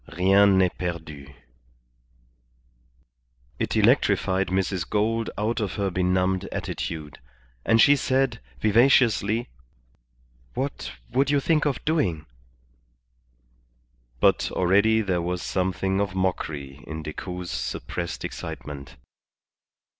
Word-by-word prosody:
Rien 95 +2 +5
n'est 90 -1 +3
perdu_." 80 -6 -5 2.3
It - - -1
electrified 95 +1 +3
Mrs. 95 -2 -1
Gould 110 +2 0
out 110 +3 -1
of 105 -4 -2
her 100 -2 -1
benumbed 95 +1 +1
attitude, 75 -3 -5 0.4
and 115 0 +3
she 145 +5 +7
said, 130 -3 0 0.2
vivaciously 115 -1 +3 1.1
"What - - -3 0.2
would 135 +2 +2
you 145 0 +3
think 155 +2 +1
of 140 -4 -2
doing?" 95 - 0 1.9
But - - +3
already 100 +5 +3
there 95 -4 0
was 90 +1 -3
something 95 +1 -1
of 95 -2 -2
mockery 75 -6 -3
in 80 0 -6
Decoud's 90 +3 -6
suppressed 85 +8 -4
excitement. 70 -2 -7
95 Hz, 100 wpm, -25 LUFS, 90-110 Hz, 2.3 s, she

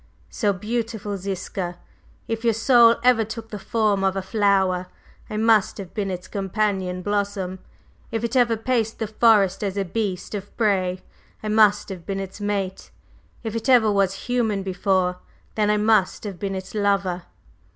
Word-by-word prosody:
So, 210 -4 +1
beautiful 215 +1 -3
Ziska, 185 -2 -4 0.5
if 225 0 -3
your 230 -2 +2
soul 235 0 +6
ever 245 -2 +5
took 225 +1 -7
the 210 - -6
form 210 -2 +1
of 190 0 +1
a 195 - -2
flower, 190 -3 +1 0.4
I 215 - -4
must 220 -2 +3
have 195 -4 -8
been 205 -3 -2
its 180 0 -5
companion 195 -2 -1
blossom; 200 -2 -2 0.5
if 225 0 -2
it 235 +2 -2
ever 240 -3 +3
paced 225 -1 -1
the 225 - -2
forest 210 -3 +3
as 200 -1 -2
a 195 - 0
beast 195 0 -3
of 205 -1 -7
prey, 185 -4 +1 0.4
I 215 - -2
must 210 -1 +4
have 185 -3 -7
been 195 +2 -3
its 195 +1 -7
mate; 200 -2 -3 0.5
if 225 -1 -4
it 230 +3 -2
ever 235 -4 +6
was 195 -1 0
human 225 -5 0
before, 185 -1 0 0.3
then 210 -1 +1
I 210 - +3
must 210 -3 +2
have 200 -5 -6
been 195 -1 -3
its 190 0 -7
lover! 195 -4 0
205 Hz, 170 wpm, -23 LUFS, 190-220 Hz, 0.5 s, soul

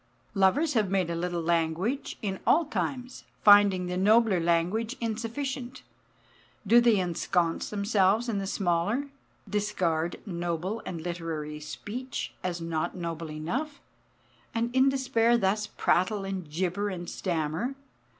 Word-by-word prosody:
Lovers 265 +12 +3
have 215 -5 +2
made 185 -3 +1
a - - -2
little 175 0 -2
language 170 - 0
in 195 -2 -2
all 330 +2 +5
times; 255 -3 -4 0.2
finding 205 -3 +7
the 180 0 -3
nobler 210 0 +4
language 175 +9 +1
insufficient, 240 +3 -4 0.8
do 235 +4 +6
they 235 -3 +4
ensconce 175 -1 0
themselves 205 +2 +2
in 215 -4 -1
the 195 - -3
smaller? 200 +10 0 0.4
discard 175 -5 -1
noble 175 +3 -3
and 170 -3 -5
literary 165 -3 -4
speech 210 - -6
as 175 -1 -2
not 165 -2 -2
noble 165 -2 -4
enough, 245 - -4 0.8
and 235 +2 -1
in 260 +1 +5
despair 240 -3 +2
thus 210 0 +1
prattle 195 +2 +1
and 190 -5 -5
gibber 185 +5 -1
and 175 -3 -5
stammer? 170 - -2
195 Hz, 130 wpm, -28 LUFS, 170-230 Hz, 0.8 s, finding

